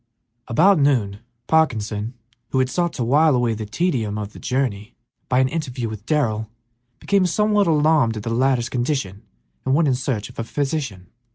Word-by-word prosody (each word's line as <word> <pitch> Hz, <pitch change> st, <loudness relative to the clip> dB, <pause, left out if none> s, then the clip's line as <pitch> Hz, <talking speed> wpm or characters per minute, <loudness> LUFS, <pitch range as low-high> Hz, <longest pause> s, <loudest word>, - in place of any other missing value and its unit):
About 175 Hz, +9 st, +4 dB
noon 120 Hz, -9 st, +1 dB, 0.3 s
Parkinson, 115 Hz, -7 st, 0 dB, 0.3 s
who -, -, -1 dB
had 130 Hz, 0 st, +1 dB
sought 175 Hz, -1 st, 0 dB
to 125 Hz, -, -2 dB
while 145 Hz, +4 st, +4 dB
away 120 Hz, -2 st, +1 dB
the 110 Hz, -1 st, -5 dB
tedium 115 Hz, -, -1 dB
of 105 Hz, 0 st, -5 dB
the -, -, -11 dB
journey 120 Hz, -4 st, -2 dB, 0.3 s
by 125 Hz, -, +2 dB
an 130 Hz, 0 st, +4 dB
interview 130 Hz, -6 st, -3 dB
with 110 Hz, +1 st, -9 dB
Darrell, 110 Hz, -8 st, 0 dB, 0.5 s
became 195 Hz, -2 st, +2 dB
somewhat 210 Hz, +2 st, +2 dB
alarmed 150 Hz, -7 st, +3 dB
at 105 Hz, -, -6 dB
the 115 Hz, -, -3 dB
latter's 125 Hz, -1 st, +2 dB
condition 120 Hz, -6 st, -2 dB, 0.4 s
and 130 Hz, -, +1 dB
went 160 Hz, 0 st, +3 dB
in 135 Hz, -, +3 dB
search 125 Hz, -4 st, -2 dB
of -, -, -12 dB
a -, -, -1 dB
physician. 135 Hz, -, -3 dB
130 Hz, 175 wpm, -21 LUFS, 110-155 Hz, 0.5 s, About